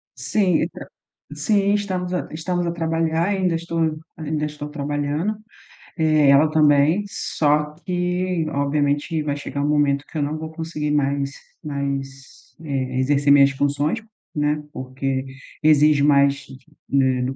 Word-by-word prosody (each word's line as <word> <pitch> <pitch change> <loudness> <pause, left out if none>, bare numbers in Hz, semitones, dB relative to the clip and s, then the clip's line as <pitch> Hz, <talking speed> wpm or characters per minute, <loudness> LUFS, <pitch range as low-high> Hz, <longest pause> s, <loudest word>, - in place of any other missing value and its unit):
Sim, 185 -6 +1
então 170 - -6 0.5
sim, 200 -2 +1
estamos 185 -3 -2
a 180 - -2
estamos 175 +2 -2
a 170 - -1
trabalhar, 165 +1 0
ainda 185 -4 +1
estou 165 -1 -1 0.2
ainda 155 -1 -2
estou 150 0 -7
trabalhando, 150 +6 -2 0.6
eh, 155 -3 +4
ela 145 +3 +6
também, 155 +4 +4
só 150 -4 0
que 180 -1 -1
obviamente 145 +2 0
vai 145 -1 -1
chegar 140 0 -4
um - - +1
momento 145 -1 +2
que 160 - -5
eu 145 - +1
não 150 +2 -2
vou 160 0 -6
conseguir 160 -2 -4
mais 140 -1 0 0.3
mais, 140 -2 -5
eh, 130 -3 -2
exercer 140 +1 +2
minhas 140 -1 +6
funções, 145 - 0 0.4
né, 150 0 0
porque 130 +1 -3 0.4
exige 150 -1 +5
mais, 140 -1 +3 0.4
eh, 130 -2 +2
do 130 +1 -2
150 Hz, 140 wpm, -22 LUFS, 140-165 Hz, 0.6 s, ela